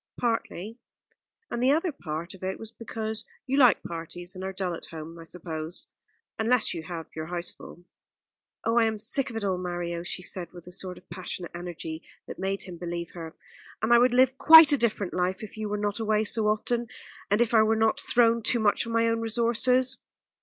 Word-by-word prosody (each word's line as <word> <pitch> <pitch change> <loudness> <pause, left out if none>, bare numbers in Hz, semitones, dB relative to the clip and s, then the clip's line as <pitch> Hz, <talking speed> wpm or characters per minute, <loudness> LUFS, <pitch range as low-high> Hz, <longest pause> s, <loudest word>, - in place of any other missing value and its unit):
"Partly, 225 -2 -2 0.7
and 240 - -2
the 255 - +4
other 330 +4 +1
part 170 - -6
of 190 - -14
it 190 0 -2
was 225 0 -9
because 220 -1 -5 0.2
you 270 - -1
like 250 -5 +6
parties 175 +2 -6
and 185 -1 -7
are 190 - -3
dull 185 -2 -3
at 165 - -7
home, 165 +1 -9
I 165 - -10
suppose, 165 -1 -4 0.5
unless 230 +2 +2
you 170 - -4
have 165 0 -6
your 155 0 -5
house 175 0 -3
full." 175 - -13 0.8
"Oh, 230 +1 +3
I 230 - +4
am 220 -1 -2
sick 245 +6 0
of 230 - -9
it 225 - -3
all, 190 -2 0
Mario," 175 -1 -3
she 175 +1 -5
said, 180 -1 -4
with 175 -2 -11
a 180 - -10
sort 185 0 -4
of - - -17
passionate 175 -1 -5
energy 170 -2 -6 0.2
that - - -9
made 195 +1 -1
him 180 -2 -8
believe 170 -1 -4
her, 165 -2 -8 0.5
"and 225 +2 +4
I 235 - +8
would 250 +1 +4
live 260 +1 +4
quite 320 -1 +10
a 285 - +5
different 210 -5 0
life 185 +3 -1
if 215 - -9
you 215 -1 -4
were 210 - -1
not 205 +1 -1
away 215 -1 +1
so 220 0 +1
often, 235 +3 0 0.4
and 205 +2 +3
if 240 -1 +2
I 220 - +7
were 220 +1 +3
not 220 +5 +2
thrown 235 -3 +3
too 235 +2 +2
much 215 +1 +2
on 230 - -4
my 230 0 +3
own 230 0 +1
resources." 240 +3 +2
205 Hz, 215 wpm, -27 LUFS, 175-230 Hz, 0.8 s, quite